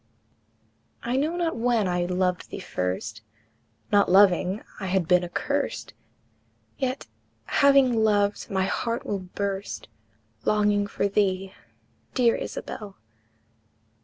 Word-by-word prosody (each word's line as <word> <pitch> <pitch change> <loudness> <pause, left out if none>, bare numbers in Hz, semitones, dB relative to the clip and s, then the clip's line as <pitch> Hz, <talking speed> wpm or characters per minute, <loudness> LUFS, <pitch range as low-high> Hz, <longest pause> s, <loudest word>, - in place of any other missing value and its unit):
I 240 +2 -1
know 305 +5 +1
not 340 -2 0
when 230 -3 +1
I 175 -1 0
loved 180 0 -1
thee - - -6
first; 110 - -3 0.7
Not 200 -3 +4
loving, 190 +1 +4 0.2
I 195 - -4
had 185 -2 +1
been 180 0 +4
accurst, 280 +11 -2 0.9
Yet, 260 0 -2 0.4
having 275 -3 +5
loved, 205 -1 +1
my 190 -1 +1
heart 230 +4 -2
will 200 - -2
burst, 195 +2 -4 0.5
Longing 205 -1 +2
for 200 - -1
thee, 195 -2 0 0.6
dear 240 -2 +4
Isabel! 205 -3 -6
200 Hz, 110 wpm, -26 LUFS, 185-235 Hz, 0.9 s, having